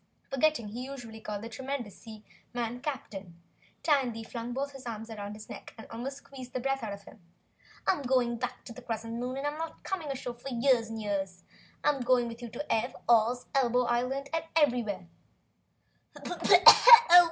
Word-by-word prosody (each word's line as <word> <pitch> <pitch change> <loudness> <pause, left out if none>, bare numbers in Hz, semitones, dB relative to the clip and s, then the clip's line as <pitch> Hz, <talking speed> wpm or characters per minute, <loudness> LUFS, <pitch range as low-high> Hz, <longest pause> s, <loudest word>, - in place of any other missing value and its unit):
Forgetting 270 -5 +1
he 240 +4 -6
usually 240 -5 -9
called 210 -1 -5
the - - -5
tremendous 260 -3 -5
seaman 230 +2 -7
"Captain," 205 - -6 0.5
Tandy 255 -7 +1
flung 235 +1 -6
both 275 +2 -4
arms 225 -1 -6
round 205 0 -6
his 215 0 -11
neck - - -10
and 220 - -10
almost 255 +4 -5
squeezed 260 -3 -11
the 255 - -2
breath 270 +1 -1
out 220 -3 -4
of 200 0 -8
him. 210 - -15 0.7
"I'm 360 - +2
going 250 -3 +1
straight - - -14
back 250 0 -5
on 235 - -8
the 255 - -11
Crescent 230 -1 -5
Moon, 250 +2 -3
and 275 - -4
I'm 295 +1 -3
not 325 0 -6
coming 365 -5 -4
ashore 255 -3 -4
for 240 +3 -9
years 240 -2 +2
and 225 0 -5
years. 195 -4 -3 0.4
I'm 290 -2 +2
going 245 -1 +2
with 230 +1 -8
you 240 - -6
to 245 +7 -3
Ev, 220 - -1
Oz, 235 +1 +3
Elbow 250 -2 +2
Island 250 +4 -1
and 325 0 0
everywhere!" 240 - +1
245 Hz, 175 wpm, -29 LUFS, 225-270 Hz, 0.7 s, Oz